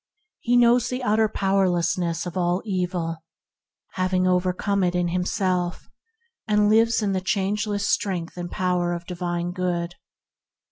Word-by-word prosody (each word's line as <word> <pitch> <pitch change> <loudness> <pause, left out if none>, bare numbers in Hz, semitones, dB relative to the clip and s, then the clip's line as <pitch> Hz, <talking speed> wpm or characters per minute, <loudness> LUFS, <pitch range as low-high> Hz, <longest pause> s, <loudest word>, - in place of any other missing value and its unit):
He 245 +1 +2
knows 240 0 +4
the 255 0 -3
utter 220 -1 +2
powerlessness 175 -4 0
of 175 0 -6
all 180 0 0
evil, 180 -4 -2 0.7
having 185 0 0
overcome 185 +2 +1
it 180 0 +1
in 175 -1 +1
himself; 180 0 -1 0.6
and 210 -1 +3
lives 225 0 +3
in 200 - +1
the 190 -1 -1
changeless 205 +1 -1
strength 180 -4 -1
and 175 -1 -5
power 180 -1 0
of 170 0 -6
divine 175 -1 -3
Good. 175 -1 -2
185 Hz, 135 wpm, -24 LUFS, 175-205 Hz, 0.7 s, knows